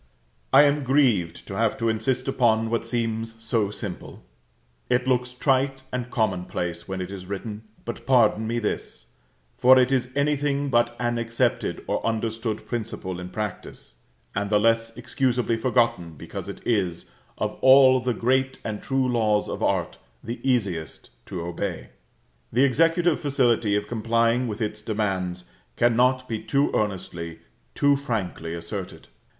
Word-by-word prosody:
I 135 Hz, +2 st, +8 dB
am 145 Hz, 0 st, +2 dB
grieved 125 Hz, -, +2 dB
to -, -, -6 dB
have -, -, +1 dB
to 115 Hz, -, -1 dB
insist 120 Hz, +4 st, 0 dB
upon 115 Hz, -4 st, +2 dB
what 115 Hz, 0 st, -1 dB
seems 115 Hz, -1 st, -2 dB
so 115 Hz, -2 st, 0 dB
simple; 105 Hz, -3 st, -7 dB, 0.7 s
it 125 Hz, +1 st, +1 dB
looks 125 Hz, -1 st, +1 dB
trite 135 Hz, +1 st, 0 dB
and 125 Hz, -1 st, -3 dB
commonplace 90 Hz, -6 st, -2 dB
when 95 Hz, -1 st, -4 dB
it 90 Hz, +1 st, -5 dB
is 95 Hz, -2 st, -8 dB
written, 105 Hz, +2 st, -5 dB, 0.2 s
but 120 Hz, -, -7 dB
pardon 110 Hz, -4 st, +4 dB
me 120 Hz, +1 st, -1 dB
this: 110 Hz, -3 st, -4 dB, 0.5 s
for 130 Hz, 0 st, +7 dB
it 130 Hz, +1 st, +4 dB
is 125 Hz, -2 st, +1 dB
anything 145 Hz, -1 st, +1 dB
but 120 Hz, -1 st, +2 dB
an 120 Hz, -1 st, 0 dB
accepted 115 Hz, 0 st, -1 dB
or -, -, -2 dB
understood 110 Hz, -1 st, -2 dB
principle 105 Hz, -6 st, -4 dB
in 90 Hz, 0 st, -7 dB
practice, 105 Hz, 0 st, -6 dB, 0.4 s
and 100 Hz, +1 st, -2 dB
the 105 Hz, 0 st, +4 dB
less 115 Hz, +1 st, +1 dB
excusably 120 Hz, -1 st, 0 dB
forgotten, 115 Hz, -7 st, +1 dB
because -, -, -7 dB
it -, -, -9 dB
is, 95 Hz, -7 st, 0 dB, 0.3 s
of -, -, -2 dB
all 130 Hz, -1 st, +7 dB
the 125 Hz, -1 st, -1 dB
great 130 Hz, +2 st, +1 dB
and 105 Hz, -2 st, -4 dB
true 135 Hz, -1 st, 0 dB
laws 110 Hz, -4 st, +1 dB
of -, -, -5 dB
art, -, -, 0 dB, 0.2 s
the 115 Hz, +2 st, -5 dB
easiest 100 Hz, -, -1 dB, 0.2 s
to 90 Hz, -, -5 dB
obey. 85 Hz, 0 st, -4 dB, 0.6 s
The 125 Hz, +4 st, +3 dB
executive 165 Hz, +5 st, +3 dB
facility 120 Hz, -7 st, +2 dB
of 105 Hz, 0 st, -1 dB
complying 115 Hz, +2 st, +1 dB
with 110 Hz, +1 st, -5 dB
its 105 Hz, 0 st, -3 dB
demands 95 Hz, -5 st, -2 dB, 0.3 s
cannot 125 Hz, +2 st, +3 dB
be 110 Hz, -2 st, -3 dB
too 140 Hz, +1 st, +1 dB
earnestly, 85 Hz, -5 st, -3 dB, 0.4 s
too 145 Hz, 0 st, +4 dB
frankly 100 Hz, -11 st, -3 dB
asserted. 90 Hz, +3 st, -7 dB
115 Hz, 150 wpm, -25 LUFS, 105-130 Hz, 0.7 s, I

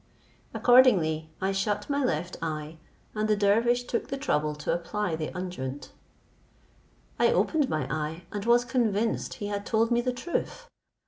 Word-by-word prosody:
Accordingly 185 Hz, -12 st, +4 dB
I 190 Hz, +1 st, 0 dB
shut 205 Hz, +1 st, -1 dB
my 285 Hz, -1 st, 0 dB
left 175 Hz, -6 st, -1 dB
eye, 155 Hz, 0 st, -4 dB, 0.3 s
and 215 Hz, 0 st, -1 dB
the 215 Hz, -, +4 dB
dervish 230 Hz, +4 st, +2 dB
took 240 Hz, -1 st, -3 dB
the 275 Hz, -, -4 dB
trouble 150 Hz, -, 0 dB
to 150 Hz, -, -2 dB
apply 175 Hz, +1 st, -2 dB
the 155 Hz, -1 st, -3 dB
unguent; 145 Hz, -7 st, -5 dB, 1.3 s
I -, -, +4 dB
opened 300 Hz, -4 st, +2 dB
my 155 Hz, -4 st, -1 dB
eye, 155 Hz, +4 st, -3 dB
and 205 Hz, -1 st, -4 dB
was 240 Hz, +1 st, +4 dB
convinced 230 Hz, -3 st, 0 dB
he 205 Hz, -, -6 dB
had 205 Hz, 0 st, -3 dB
told 225 Hz, +2 st, +1 dB
me 240 Hz, 0 st, +3 dB
truth. 300 Hz, -, -3 dB
205 Hz, 150 wpm, -27 LUFS, 160-240 Hz, 1.3 s, Accordingly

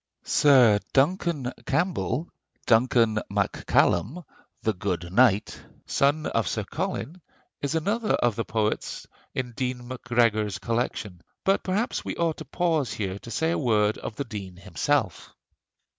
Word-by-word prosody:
Sir 125 Hz, -8 st, +5 dB
Duncan 145 Hz, -2 st, +1 dB
Campbell, 170 Hz, -4 st, 0 dB, 0.4 s
"Duncan 115 Hz, -1 st, +3 dB
Mac -, -, -2 dB
Cailem, 160 Hz, -, +2 dB, 0.4 s
the 110 Hz, -, +1 dB
good 90 Hz, -2 st, -3 dB
knight," 105 Hz, -3 st, +3 dB, 0.2 s
son 145 Hz, +3 st, +1 dB
of 115 Hz, -, 0 dB
Sir 110 Hz, -, -1 dB
Colin, 180 Hz, -, -4 dB, 0.4 s
is 145 Hz, +3 st, -1 dB
another 215 Hz, +7 st, 0 dB
of 120 Hz, -3 st, +1 dB
the 115 Hz, -, -1 dB
poets 110 Hz, -1 st, -2 dB, 0.3 s
in 125 Hz, -2 st, -2 dB
Dean 125 Hz, 0 st, -3 dB
Macgregor's 115 Hz, -5 st, +1 dB
collection; 105 Hz, -3 st, -3 dB, 0.2 s
but 195 Hz, +1 st, +2 dB
perhaps 205 Hz, +6 st, -1 dB
we -, -, -4 dB
ought 165 Hz, -2 st, 0 dB
to -, -, -8 dB
pause 160 Hz, -9 st, 0 dB
here 100 Hz, -3 st, -3 dB
to 115 Hz, -, -11 dB
say 160 Hz, +7 st, 0 dB
a -, -, 0 dB
word 110 Hz, -5 st, +2 dB
of 110 Hz, -, -6 dB
the 140 Hz, -, -2 dB
Dean 100 Hz, -6 st, -7 dB
himself. 90 Hz, -4 st, -1 dB
120 Hz, 140 wpm, -26 LUFS, 105-155 Hz, 0.4 s, Sir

